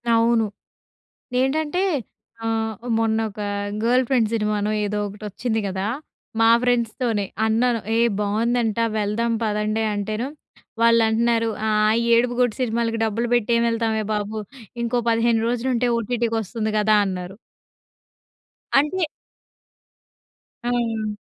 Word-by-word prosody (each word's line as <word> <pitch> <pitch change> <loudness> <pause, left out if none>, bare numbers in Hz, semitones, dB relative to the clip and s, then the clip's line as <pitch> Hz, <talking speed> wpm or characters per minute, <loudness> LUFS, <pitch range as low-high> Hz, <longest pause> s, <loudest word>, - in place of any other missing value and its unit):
అవును. 230 -1 +3 1.0
ఏంటంటే 305 +6 0 0.7
ఆహ్, 225 -1 -1 0.2
మొన్న 225 -1 +1
ఒక 210 - -10 0.4
'గర్ల్ 250 +2 +3
ఫ్రెండ్' 240 -5 +2
సినిమానో 210 -1 0
ఏదో 210 0 -2
ఒకటి 205 +2 -9
వచ్చింది 225 +2 -2
కదా! 190 +1 -3 0.5
మా 225 - +6
ఫ్రెండ్స్‌తోనే 235 -3 0 0.2
అన్నాను, 230 +1 +2 0.2
ఏ! - - +3 0.2
బాగుందంట. 225 +2 0 0.2
వెళ్దాం 220 +3 0
పదండి 215 +1 0
అంటేను, 215 +5 -2 0.5
వాళ్ళంటున్నారు 230 0 +3 0.2
ఆహ్, 215 +1 +3 0.2
"ఏడుపుగొట్టు 245 -1 +2
సినిమాలకి 230 -1 0
డబ్బులు 225 +2 -1
పెట్టి 240 -1 +1
ఏం 235 - +2
వెళ్తామే 225 -1 0
బాబు. 210 +1 -3 0.4
ఇంకో 240 +1 0
15 230 0 +2
రోజులు 245 +2 -1
ఉంటే 245 +1 +1
ఓటీటీకొస్తుంది 225 -2 -2
కదా!" 215 0 +4
అన్నారు. 185 0 -5 1.4
అంటే 325 +6 +2 1.6
హ్మ్. 230 -3 -1
225 Hz, 105 wpm, -22 LUFS, 215-235 Hz, 1.6 s, మా